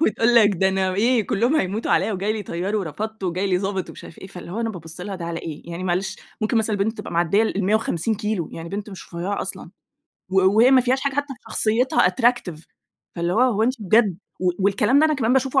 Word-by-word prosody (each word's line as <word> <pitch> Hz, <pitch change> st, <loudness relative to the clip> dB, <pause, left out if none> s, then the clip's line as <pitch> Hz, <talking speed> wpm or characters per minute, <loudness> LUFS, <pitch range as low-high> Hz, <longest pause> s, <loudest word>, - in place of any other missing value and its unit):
وتقول 230 Hz, -2 st, +2 dB
لك 220 Hz, -3 st, +7 dB
ده 190 Hz, +2 st, +2 dB
أنا 190 Hz, -1 st, 0 dB
إيه، 225 Hz, +1 st, +2 dB
كلّهم 240 Hz, +9 st, +1 dB
هيموتوا 210 Hz, -2 st, -1 dB
عليّا، 190 Hz, +6 st, +2 dB
وجاي 200 Hz, +2 st, -1 dB
لي 220 Hz, -, -4 dB
طيار 185 Hz, +3 st, -3 dB
ورفضته، 210 Hz, +3 st, -4 dB
وجاي 185 Hz, +3 st, -1 dB
لي 185 Hz, -2 st, +1 dB
ضابط 190 Hz, -1 st, -3 dB
ومش -, -, -11 dB
عارف -, -, -13 dB
إيه، -, -, -9 dB
فاللي 180 Hz, -2 st, -10 dB
هو 220 Hz, -, -3 dB
أنا 225 Hz, -1 st, -1 dB
بابُص 165 Hz, -3 st, -9 dB
لها 195 Hz, +2 st, -5 dB
ده 175 Hz, -, -6 dB
على 170 Hz, 0 st, -4 dB
إيه؟ 155 Hz, -3 st, -7 dB
يعني 170 Hz, +2 st, -5 dB
معلش 185 Hz, +1 st, -1 dB, 0.2 s
ممكن 215 Hz, +2 st, 0 dB
مثلًا 220 Hz, -1 st, +1 dB
البنت 215 Hz, +3 st, -1 dB
تبقى -, -, -7 dB
معدية 175 Hz, +5 st, +2 dB
ال150 210 Hz, -1 st, 0 dB
كيلو، 210 Hz, -6 st, -2 dB
يعني 165 Hz, 0 st, -7 dB
بنت 205 Hz, +3 st, -5 dB
مش 190 Hz, -, -10 dB
رُفيعة 185 Hz, +4 st, -2 dB
أصلًا. -, -, -7 dB, 0.6 s
و 190 Hz, 0 st, +3 dB, 0.2 s
وهي 240 Hz, +4 st, +6 dB
ما 265 Hz, -1 st, +6 dB
فيهاش 255 Hz, +2 st, +1 dB
حاجة 280 Hz, -1 st, -1 dB
حتّى 285 Hz, -1 st, -2 dB
في -, -, -26 dB
شخصيتها 225 Hz, -3 st, +2 dB
attractive 230 Hz, -7 st, 0 dB, 0.5 s
فاللي 170 Hz, 0 st, -1 dB
هو، 225 Hz, -, +2 dB
هو 240 Hz, -4 st, +3 dB
أنتِ 250 Hz, +3 st, +2 dB
بجد. 205 Hz, -2 st, +3 dB, 0.2 s
و 185 Hz, -, +2 dB
والكلام 205 Hz, +6 st, +3 dB
ده -, -, +5 dB
أنا 310 Hz, -, +1 dB
كمان 245 Hz, -4 st, +1 dB
باشوفه 270 Hz, +1 st, +2 dB
205 Hz, 230 wpm, -22 LUFS, 185-230 Hz, 0.6 s, لك